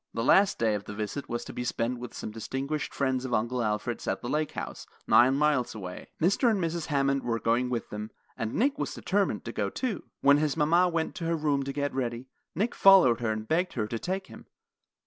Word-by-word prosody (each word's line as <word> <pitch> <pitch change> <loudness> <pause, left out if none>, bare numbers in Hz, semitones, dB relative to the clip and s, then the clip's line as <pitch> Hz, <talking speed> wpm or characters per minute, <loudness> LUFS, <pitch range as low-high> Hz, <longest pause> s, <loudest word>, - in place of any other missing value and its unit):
The 115 - -1
last 195 +9 +4
day 110 -2 +2
of 105 -1 -3
the 105 - -7
visit 110 +7 -4
was 120 0 -3
to - - -8
be 125 - -4
spent 120 +1 -2
with 125 0 -8
some - - -5
distinguished 135 +7 -3
friends 130 -2 0
of 130 -2 -1
Uncle 120 +3 0
Alfred's 110 +2 -2
at - - 0
the - - -5
Lake 150 0 -1
House, - - -6 0.2
nine 130 +2 +5
miles 145 -5 +1
away. 90 -4 -8
Mr. 200 - +3
and 215 -3 +1
Mrs. 170 -2 -2
Hammond 140 -1 +1
were 115 -2 -1
going 120 +3 +1
with 120 -3 -3
them, 105 +1 -5 0.3
and 115 0 -3
Nick 275 +4 +1
was - - -3
determined - - 0
to - - -4
go, - - -1
too. 250 -7 -3 0.2
When 140 +1 +6
his 150 0 0
mama 170 +4 +4
went 165 -2 -1
to 170 - -4
her 165 0 +1
room 150 -3 +1
to 135 0 -3
get 145 0 -2
ready, 120 -1 -3 0.3
Nick 215 +8 0
followed 185 - +6
her 115 -2 0
and 110 0 -4
begged 175 +3 +1
her 110 -4 -1
to 115 +2 -4
take 190 - -3
him. - - -13
135 Hz, 230 wpm, -28 LUFS, 115-160 Hz, 0.3 s, When